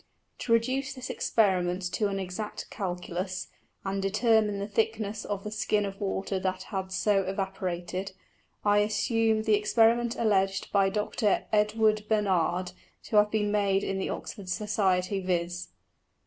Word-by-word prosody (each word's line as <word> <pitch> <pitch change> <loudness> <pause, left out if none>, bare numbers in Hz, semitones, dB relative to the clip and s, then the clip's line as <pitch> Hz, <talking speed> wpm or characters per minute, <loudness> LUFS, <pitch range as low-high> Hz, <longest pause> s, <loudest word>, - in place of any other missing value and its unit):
To - - -4
reduce 260 +4 +2
this 255 -1 -5
Experiment 185 -4 +1
to 210 - +1
an 195 -1 -2
exact 190 +3 -5
Calculus, 185 -1 -4 0.4
and 195 0 -1
determine 210 +1 +2
the 200 0 -3
thickness 215 0 -1
of 200 -1 -3
the 210 - -5
Skin 210 -1 0
of 195 +1 -7
Water 195 -1 -1
that 185 0 -2
had 190 -2 -4
so 195 +1 +2
evaporated, 190 -1 -3 0.5
I 205 0 +5
assume 220 +1 +1
the 220 -1 +2
Experiment 230 +3 +3
alledg'd 195 -3 +1
by 195 -1 +4
Dr. 210 +1 0
Edward 215 0 +3
Bernard 185 -4 +1 0.3
to 215 - 0
have 210 0 +6
been 210 -1 0
made 200 -2 +2
in 195 0 -2
the - - -2
Oxford 200 -4 -6
Society, 195 -2 0
_viz. 175 -1 -1
200 Hz, 145 wpm, -28 LUFS, 190-215 Hz, 0.5 s, have